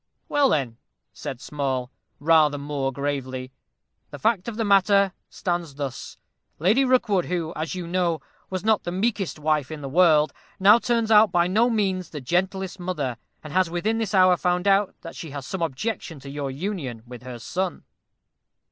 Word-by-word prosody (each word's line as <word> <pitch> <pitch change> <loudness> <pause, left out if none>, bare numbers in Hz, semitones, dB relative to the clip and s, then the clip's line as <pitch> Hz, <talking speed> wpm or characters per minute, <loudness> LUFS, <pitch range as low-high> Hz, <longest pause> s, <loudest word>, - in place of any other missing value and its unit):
"Well, 285 -2 +3
then," 130 - 0 0.4
said 130 - -6
Small, 130 -4 -3 0.3
rather 155 -1 +4
more 140 -1 -2
gravely, 130 -2 -3 0.6
"the - - -8
fact 215 -3 +1
of 230 -2 -5
the 225 - 0
matter 200 -1 +4 0.2
stands 175 -5 -3
thus: 140 -3 -6 0.4
Lady 205 - +3
Rookwood, 235 -8 +2
who, 170 -2 -2
as 160 +4 -3
you 180 -2 -4
know, 170 -2 0 0.3
was 185 0 -3
not 220 -1 +3
the 175 - -4
meekest 195 -1 -1
wife 150 -3 0
in 155 -1 -7
the 140 - -5
world, 155 0 +4 0.3
now 205 +4 +7
turns 230 -2 0
out 210 -2 +7
by 175 -1 +3
no 220 +7 +3
means 190 -6 0
the 150 - -6
gentlest 190 +6 -1
mother, 155 -9 -2 0.3
and 155 -1 -8
has 185 -2 +3
within 210 +7 -1
this 215 -2 -1
hour 185 -1 +6
found 180 +2 0
out 195 0 +3
that 165 - -9
she 160 - -7
has 140 -1 -7
some 190 +4 -5
objection 165 - -3
to 140 +1 -9
your 140 -1 -3
union 135 - -4
with 125 -1 -10
her 125 -1 -8
son." 180 +9 -3
175 Hz, 175 wpm, -24 LUFS, 145-195 Hz, 0.6 s, now